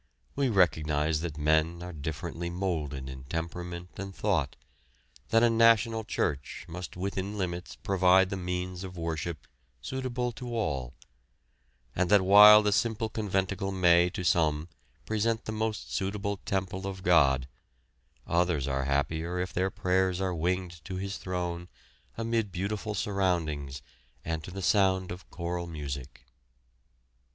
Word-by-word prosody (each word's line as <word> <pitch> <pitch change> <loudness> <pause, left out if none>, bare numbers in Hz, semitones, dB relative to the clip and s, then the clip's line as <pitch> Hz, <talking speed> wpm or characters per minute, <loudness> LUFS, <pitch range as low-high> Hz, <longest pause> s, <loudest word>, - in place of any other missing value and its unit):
We 140 -2 +1
recognise 80 -6 +2
that 80 -3 -4
men 80 +3 +1
are 90 0 -7
differently 80 +3 -4
moulded 80 -7 -3
in 65 0 -8
temperament 85 +3 -5
and 95 -1 -6
thought, 85 -10 0 0.7
that 115 0 +4
a 120 - +6
national 115 -1 +4
church 70 -5 -2
must 90 +1 -7
within 100 +2 -3
limits 90 -2 -4
provide 95 0 +3
the - - -1
means 90 0 -3
of 90 -1 -8
worship 80 -1 -4 0.3
suitable 125 - -3
to 120 +1 -6
all; 70 - -2 1.0
and 90 0 +1
that 105 -2 +6
while 105 +2 +9
the 105 - +2
simple 110 +1 0
conventicle 95 -2 -1
may 90 -2 +4
to 90 - -5
some 80 -2 +2 0.4
present 110 +1 0
the - - -3
most 110 -1 -3
suitable 100 +1 -2
temple 95 0 -2
of 95 -1 -6
God, 70 -7 +4 0.8
others 85 -5 +1
are 70 -1 -1
happier 80 +5 -1
if 90 +1 -3
their 95 +1 +1
prayers 95 -1 +1
are 95 -1 0
winged 85 -1 -2
to 95 - -5
His 100 +2 -4
Throne 90 -1 -3 0.5
amid 115 -2 -1
beautiful 100 +3 -3
surroundings 85 - -1 0.4
and 80 -1 -2
to - - -8
the 95 +1 -6
sound 95 -2 +3
of 90 +1 -9
choral 85 0 -4
music. 70 -4 -7
90 Hz, 140 wpm, -29 LUFS, 80-100 Hz, 1.0 s, while